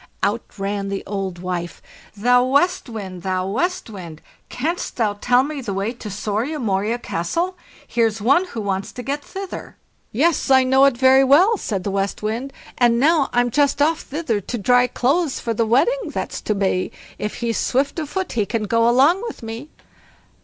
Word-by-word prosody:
Out - - +1 0.2
ran 200 0 -2
the 195 0 -3
old 195 -3 -4
wife. 175 -1 -4 0.4
"THOU 245 +4 +4
WEST 285 +3 +1
WIND, 190 -5 -7
THOU 185 0 -1
WEST 355 - -1
WIND! 170 -6 -9 0.3
Canst 325 +8 -3
thou 220 -4 +1
tell 245 +5 +2
me 290 0 -4
the 205 -6 -4
way 200 +4 -1
to 230 -3 -8
SORIA 215 +9 -2
MORIA 215 -2 0
CASTLE? 335 - -2 0.3
Here's 225 -2 +1
one 275 - +3
who 235 -11 -6
wants 195 -1 -2
to 250 - -7
get 285 +2 -3
thither." 385 -1 -8 0.3
"Yes, 305 +7 +1
I 260 -1 +6
know 265 +1 +5
it 275 -3 +3
very 260 +1 +6
well", 335 - +5
said 200 - -3
the 200 - -2
West 195 +1 -2
Wind, 230 +6 -2 0.3
and 235 -1 +4
now 300 +1 +3
I'm 245 0 +1
just 285 +2 +2
off 310 +2 +2
thither 270 -8 -2
to 240 - -4
dry 245 +3 +4
clothes 280 +5 0
for 230 - -2
the 225 0 0
wedding 470 - +2
that's - - -4
to 215 - -1
be; 190 -2 0 0.3
if 210 - -3
he's 235 -2 -2
swift 280 +5 0
of 305 -3 -4
foot 380 +1 -3
he 215 -4 0
can 230 -2 -1
go 230 +2 +2
along 285 +10 +4
with - - -8
me." 225 +6 -7
240 Hz, 190 wpm, -21 LUFS, 205-280 Hz, 0.4 s, I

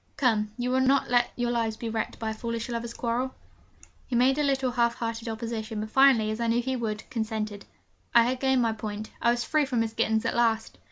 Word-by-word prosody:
Come, 220 -5 +2
you 245 0 -1
will 260 - +3
not 265 -1 +2
let 245 -1 +3
your 240 0 -1
lives 225 -2 -1
be 230 - -5
wrecked 220 -1 -3
by 220 -1 -3
a - - -3
foolish 230 +1 -4
lovers' 235 0 -3
quarrel?' 245 +2 -2 0.7
He 250 - -2
made 260 +4 +3
a - - +2
little 270 -2 +1
half 235 -1 +1
hearted 230 0 -4
opposition, 220 -1 -4
but 215 +1 -5
finally, 260 -5 +5
as 215 - -4
I 235 - 0
knew 230 +1 +2
he 260 +2 -1
would, 215 -3 -3
consented. 215 -3 -3 0.5
I 235 - +8
had 250 +2 -1
gained 265 -2 +2
my 230 - +2
point: 215 0 -6
I 235 - +3
was 240 0 +1
free 305 +4 +2
from 250 -4 0
Miss 225 -1 -2
Gittens 220 -1 +1
at - - 0
last! 225 -2 +1
235 Hz, 230 wpm, -27 LUFS, 220-250 Hz, 0.7 s, I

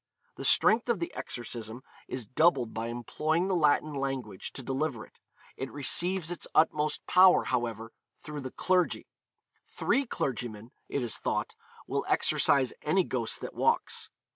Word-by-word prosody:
The - - -6
strength 230 +3 +5
of 235 - +2
the 170 - -4
exorcism 120 0 -6 0.2
is 130 -3 -4
doubled 130 -1 +2
by 115 +1 -3
employing 155 +9 -1
the 190 - +1
Latin 150 -1 +2
language 135 -8 -4
to 135 - -5
deliver 135 -2 -2
it; - - -26 0.4
it 135 - -5
receives 170 +6 +1
its 175 - -4
utmost 155 -1 +2
power, 185 0 +6
however, 115 -2 -2 0.3
through 150 -1 -7
the 130 - -5
clergy; 180 +5 +1 0.6
three 275 -1 0
clergymen, 120 - -4 0.2
it 140 - -1
is 120 - -2
thought, - - -2 0.3
will - - -1
exorcise 135 -3 +3
any 185 +5 +2
ghost 120 -8 -2
that - - -6
walks. - - 0
135 Hz, 145 wpm, -29 LUFS, 120-165 Hz, 0.6 s, power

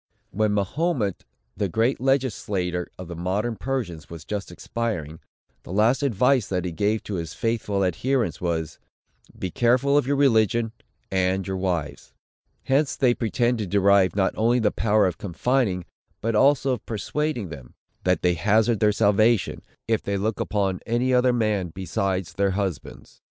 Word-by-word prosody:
When 110 +2 +1
Mahomet, 105 - -1 0.3
the 100 - -1
great 115 +7 +1
legislator 105 -10 0
of 90 - -8
the 85 - -7
modern 100 +7 -1
Persians, 110 - -4
was 80 -2 -9
just 100 -3 -4
expiring, 85 -6 -4 0.4
the - - -11
last 110 +7 +3
advice 125 -1 +2
that 90 -1 -2
he 90 - -2
gave 105 +5 0
to 100 - -4
his 80 -1 -8
faithful 105 -3 0
adherents, 115 - -1
was, 80 -3 -2 0.6
"Be 95 - -4
watchful 130 +4 +4
of 130 - -3
your 140 - +2
religion, 115 -4 +3 0.4
and 95 0 +1
your 95 -1 -3
wives." 85 -6 -3 0.5
Hence 135 +2 +1
they 125 -3 +3
pretend 120 +1 0
to 105 - -2
derive 100 0 +3
not 95 -2 +1
only 115 +3 +2
the 110 -4 +2
power 105 -1 +2
of 90 -3 -2
confining, 100 -1 0 0.3
but 115 +1 -1
also 135 +4 +4
of 120 - -6
persuading 120 - -2
them, 70 -6 -11 0.3
that 90 0 +1
they 90 -1 +3
hazard 105 +5 +2
their 105 -1 +4
salvation, 110 +1 +2 0.3
if 110 -1 +1
they 100 0 -2
look 105 +2 -2
upon 100 -3 -1
any 120 +3 +1
other 125 0 +4
man 110 -6 0
besides 95 -1 -2
their 100 -1 +1
husbands. 95 -7 -5
105 Hz, 160 wpm, -24 LUFS, 95-120 Hz, 0.6 s, watchful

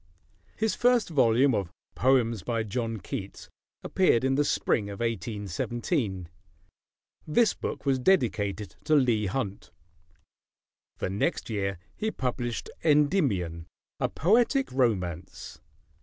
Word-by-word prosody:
His 220 0 0
first 245 -4 +2
volume 130 -2 +4
of 100 -5 -1 0.2
"Poems 120 -5 +2
by 115 +5 -1
John 115 +1 -3
Keats" 100 +1 -7 0.3
appeared 175 -11 +2
in 130 0 +2
the 145 +2 +3
spring 110 -7 0
of 100 - -7
1817. 110 - -2 1.0
This 210 +8 +3
book - - -5
was 135 -2 +2
dedicated 110 - +1
to 155 - +3
Leigh 120 -7 +3
Hunt. 100 -1 -4 1.3
The - - -3
next 100 +3 -1
year 100 -3 -2 0.2
he 220 - -2
published 125 - -3
"Endymion: 140 - +2 0.3
A - - 0
Poetic 240 - +2
Romance." 95 - -2
120 Hz, 110 wpm, -27 LUFS, 100-145 Hz, 1.3 s, volume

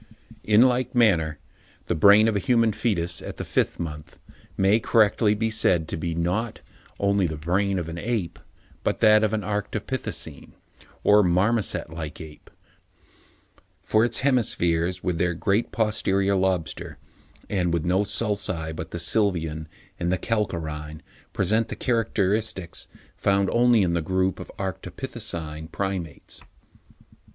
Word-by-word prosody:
In 105 +2 +5
like 130 0 +1
manner, 85 -10 +3 0.5
the - - 0
brain 100 +6 +6
of 110 - +1
a - - +2
human 115 +1 +2
foetus, 90 -7 0
at - - -7
the - - -5
fifth - - 0
month, 75 -3 -7 0.4
may 100 +3 +4
correctly 110 -2 +3
be 110 +1 -1
said 85 -7 +2
to - - -2
be, 80 +1 -3
not 90 +7 -2 0.4
only 100 -2 +2
the 80 - -4
brain 95 +5 0
of 85 -3 -3
an 85 +1 -6
ape, 100 -6 -3 0.4
but - - -1
that 110 0 +6
of 110 - +2
an 110 -1 -1
Arctopithecine 105 0 -4 0.5
or 105 +1 +6
marmoset 95 +1 +1
like 80 -2 -6
ape; 80 -3 -12 1.3
for 110 +1 +3
its 120 -1 0
hemispheres, 90 -9 +1
with 90 -3 -1
their 90 0 +1
great 100 +6 0
posterior 100 -3 +1
lobster, 95 -3 -1 0.5
and 90 -4 0
with 85 -1 -1
no 95 +3 +2
sulci 95 -7 -2
but 80 - -6
the - - -5
sylvian 85 -4 0 0.3
and 85 0 0
the 90 - +1
calcarine, 80 -7 -3 0.3
present 110 +4 +1
the - - -6
characteristics 105 -6 -1 0.3
found 100 -1 +1
only 120 -3 +4
in 85 -2 +1
the 85 - 0
group 95 +2 0
of - - -7
the - - -14
Arctopithecine 80 -3 -5
Primates. 95 -5 -5
95 Hz, 145 wpm, -25 LUFS, 85-110 Hz, 1.3 s, brain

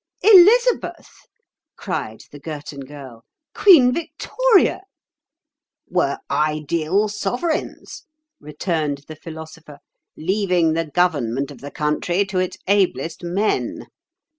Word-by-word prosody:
"Elizabeth!" 445 +5 +5 0.6
cried - - -5
the 145 - -11
Girton 145 -2 -8
Girl. 135 -4 -11 0.3
"Queen 280 -11 +6
Victoria!" 385 - +1 1.1
"Were 140 -6 0
ideal 155 +6 0
sovereigns," 280 - -4 0.3
returned 150 -1 -3
the 155 - -9
Philosopher, 160 -1 -11 0.4
"leaving 180 -2 +1
the 165 0 -2
government 140 -6 0
of 130 -4 -13
the 145 - -7
country 155 +6 -1
to 195 -1 -2
its 185 0 -2
ablest 185 -5 0
men. 190 +5 -2
165 Hz, 95 wpm, -20 LUFS, 150-205 Hz, 1.1 s, Queen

